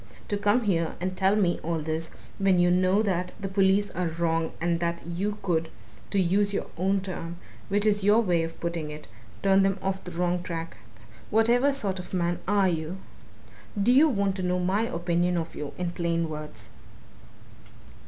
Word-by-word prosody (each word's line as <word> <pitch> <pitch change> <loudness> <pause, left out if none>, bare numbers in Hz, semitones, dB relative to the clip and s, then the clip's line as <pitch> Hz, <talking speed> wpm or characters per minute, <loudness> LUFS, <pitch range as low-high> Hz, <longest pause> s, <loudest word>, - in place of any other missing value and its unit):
to 205 - -1
come 205 +4 +2
here 170 -6 0
and 185 +1 -2
tell 190 +2 +3
me 185 -5 +2
all 165 +1 -1
this 160 +1 -3 0.3
when 195 -2 +3
you 175 0 +4
know 185 +3 +3
that 180 -3 -1
the 195 - -3
police 195 +1 +2
are 180 0 -1
wrong 165 0 0
and 170 0 0
that 170 0 -1
you 195 +5 -2
could 165 -3 0 0.4
to 200 - +1
use 200 +3 +2
your - - -1
own 190 +4 +1
term, 175 -3 -6 0.3
which 205 +1 +1
is 205 -2 +2
your 205 +3 +5
way 180 -7 +2
of 165 0 -5
putting 170 -3 -3
it 150 0 -8 0.4
turn 195 0 +5
them 195 0 +2
off 195 0 -2
the - - -7
wrong 175 +1 0
track? 165 -7 -5 0.5
Whatever 240 +5 +4
sort 200 -9 0
of 180 - -6
man 175 -1 0
are 200 -1 +3
you? 165 +1 -2 0.8
Do 210 +5 +4
you 290 +5 +6
want 200 -6 0
to - - -3
know 180 0 0
my 190 +5 +1
opinion 175 -1 0
of 165 -1 -3
you 150 -1 -5
in 180 -1 -2
plain 170 -1 -1
words?" 150 -1 -7
180 Hz, 185 wpm, -27 LUFS, 170-200 Hz, 0.8 s, you